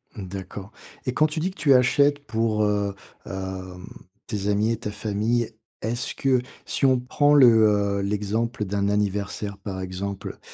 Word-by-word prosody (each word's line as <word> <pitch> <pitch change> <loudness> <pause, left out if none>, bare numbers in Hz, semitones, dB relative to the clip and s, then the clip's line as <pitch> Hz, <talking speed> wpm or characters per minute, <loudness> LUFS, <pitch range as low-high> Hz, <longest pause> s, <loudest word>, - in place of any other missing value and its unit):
Mmh, 100 -3 -6
d'accord 95 +2 -7 0.3
et 125 - -1
quand 155 +4 +3
tu 155 +1 -4
dis 180 +4 -1
que - - -19
tu 140 -1 +5
achètes 140 +3 +4
pour, 110 -2 0
heu, 100 -1 0 0.3
hem, 95 -1 -6 0.4
tes 105 -3 -3
amis 105 +2 +2
et 115 - -1
ta 105 -2 -5
famille. 110 +2 -1 0.3
Est-ce 120 +3 -2
que 130 -2 +2 0.2
si - - 0
on 130 -1 +4
prend 145 +4 +3
le, 135 -4 +8 0.5
heu - - -1
l'exemple 105 +3 -1
d'un 100 +1 0
anniversaire 100 0 -1
par 95 -1 -6
exemple, 95 +1 -5
105 Hz, 165 wpm, -24 LUFS, 100-125 Hz, 0.5 s, le